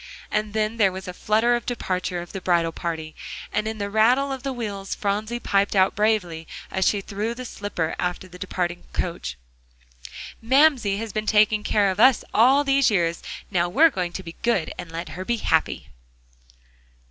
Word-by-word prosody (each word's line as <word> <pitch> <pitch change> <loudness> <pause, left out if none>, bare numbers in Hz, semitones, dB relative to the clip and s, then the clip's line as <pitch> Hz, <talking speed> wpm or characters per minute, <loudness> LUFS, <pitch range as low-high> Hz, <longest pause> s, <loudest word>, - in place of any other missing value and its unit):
And 210 -1 -1
then 215 +1 0
there 200 -4 +4
was 190 0 -7
a 180 - -5
flutter 220 +6 +2
of 240 - -4
departure 185 -6 -2
of 175 - -13
the 195 - -6
bridal 170 -2 +2
party, 160 -2 -5 0.4
and 215 +1 0
in 220 0 -3
the 200 -1 -2
rattle 240 +7 +3
of 265 -1 -4
the 275 +1 -3
wheels 205 -6 -4
Phronsie 215 +4 -2
piped 200 -2 +1
out 190 0 +4
bravely 190 -7 0 0.2
as 190 0 +1
she 205 - +2
threw 210 +4 -3
the 255 +1 -7
slipper 200 -8 -3
after 180 +1 -2
the 180 0 -13
departing 175 -1 -3
coach: 65 - -3 1.0
"Mamsie 255 -4 +4
has 220 -1 -5
been 215 0 -2
taking 215 0 +4
care 205 -2 +2
of 190 - -5
us 255 +1 +6
all 265 +6 +5
these 275 -1 +3
years; 170 -5 0 0.3
now 175 -2 +1
we're 315 - +5
going 180 -6 -2
to 190 - -5
be 165 -1 -8
good 230 -9 0
and 165 - -8
let 165 +1 -5
her 185 - -6
be 235 +4 -1
happy." 60 - 0
205 Hz, 185 wpm, -24 LUFS, 180-225 Hz, 1.0 s, us